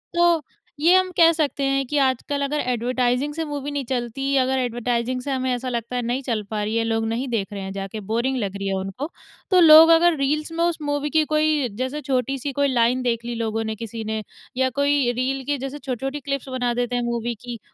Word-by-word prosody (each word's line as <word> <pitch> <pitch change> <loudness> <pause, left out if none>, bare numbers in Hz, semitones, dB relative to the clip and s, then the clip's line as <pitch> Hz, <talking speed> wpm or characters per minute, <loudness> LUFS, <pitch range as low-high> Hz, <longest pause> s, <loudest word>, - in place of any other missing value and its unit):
तो 345 -2 +4 0.4
ये 335 +4 +5
हम 370 0 +3
कह 335 -1 +7
सकते 295 -3 -1
हैं 275 0 +1
कि 295 - -1
आजकल 265 +2 -1
अगर 290 +2 -1
ऐड्वर्टाइज़िंग 250 +3 0
से 325 +1 -3
मूवी 290 -1 -4
नहीं 285 -2 -3
चलती, 260 +2 -2
अगर 265 0 +2
ऐड्वर्टाइज़िंग 240 +1 -1
से 275 +2 -4
हमें 260 -1 -1
ऐसा 255 +1 -3
लगता 235 0 -4
है 245 - 0
नहीं 245 +3 -2
चल 230 -4 -1
पा 215 - -1
रही 215 +2 -2
है, 230 - +2
लोग 225 0 0
नहीं 235 +4 -2
देख 215 -5 -1
रहे 200 - -5
हैं 190 - -5
जाके, 195 +2 -5
बोरिंग 235 +6 -1
लग 195 0 -4
रही 195 0 -4
है 195 - 0
उनको। 195 +9 -4 0.4
तो 365 - +6
लोग 320 0 +9
अगर 340 0 +4
रील्स 300 +3 -1
में 335 +1 -1
उस 345 -1 +1
मूवी 290 0 -1
की 315 0 +3
कोई 305 -3 +2
जैसे 280 +4 -2
छोटी 265 0 -1
सी 280 +2 -3
कोई 285 +1 +2
लाइन 250 -1 +2
देख 235 -2 -1
ली 240 0 -3
लोगों 225 -1 -2
ने 220 0 -3
किसी 225 0 -6
ने 220 0 -3 0.4
या 260 0 +2
कोई 285 -3 +2
रील 260 +2 -2
की 290 +1 0
जैसे 270 +2 -6
छोटी-छोटी 270 +2 -4
क्लिप्स 275 -1 -4
बना 245 -2 -1
देते 245 0 -1
हैं, 245 - 0
मूवी 235 0 -2
की। 240 -2 -7
255 Hz, 235 wpm, -23 LUFS, 235-285 Hz, 0.4 s, लोग